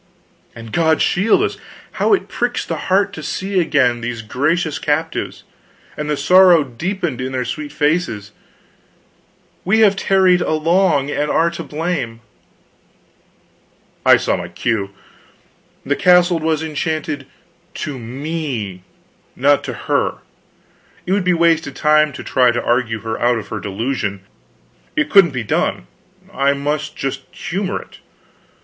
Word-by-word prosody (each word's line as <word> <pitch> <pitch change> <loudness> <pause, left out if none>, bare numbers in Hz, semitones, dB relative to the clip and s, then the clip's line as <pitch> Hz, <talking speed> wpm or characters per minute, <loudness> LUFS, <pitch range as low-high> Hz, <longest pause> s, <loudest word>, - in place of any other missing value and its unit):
And 115 -1 -10
God 160 -1 +2
shield 200 +5 +3
us, - - -2 0.3
how - - 0
it - - -6
pricks - - -2
the - - -3
heart 195 +1 +2
to - - -7
see 190 0 -2
again 130 -8 +2
these 115 -1 -4
gracious 155 +8 -1
captives, 160 +2 -2 0.5
and 150 0 -4
the 150 - 0
sorrow 180 +2 +6
deepened 155 - -4
in 130 +1 -4
their 125 -1 -1
sweet 150 +1 -5
faces! 145 - -1 1.3
We 220 +5 +3
have 200 -2 +5
tarried 190 -2 +3
along, 155 -2 +2
and 150 0 -1
are 170 +1 +2
to 170 - -6
blame." 150 -8 -3 1.8
I - - +7
saw - - 0
my 85 - -5
cue. 100 +3 -2 1.0
The 145 +1 +1
castle 180 -1 +4
was 160 0 0
enchanted 155 -2 -3 0.6
to 145 -4 -5
me, 125 - -4 0.5
not - - +3
to - - -4
her. - - 0 0.9
It 180 - -3
would 200 0 +2
be 180 0 +2
wasted 165 -3 +2
time 155 0 +3
to 140 - -8
try 125 -1 +3
to 120 0 -1
argue 120 -3 0
her 110 +1 -4
out 120 0 +3
of 110 - -7
her 110 - -4
delusion, 100 -1 -3 0.7
it 305 -1 0
couldn't 195 -4 +7
be 125 -4 -4
done; 105 - -1 0.5
I 140 +1 +2
must 150 +2 -3
just 135 0 -3
humor 190 +2 -3
it. - - -15
150 Hz, 140 wpm, -18 LUFS, 125-175 Hz, 1.8 s, I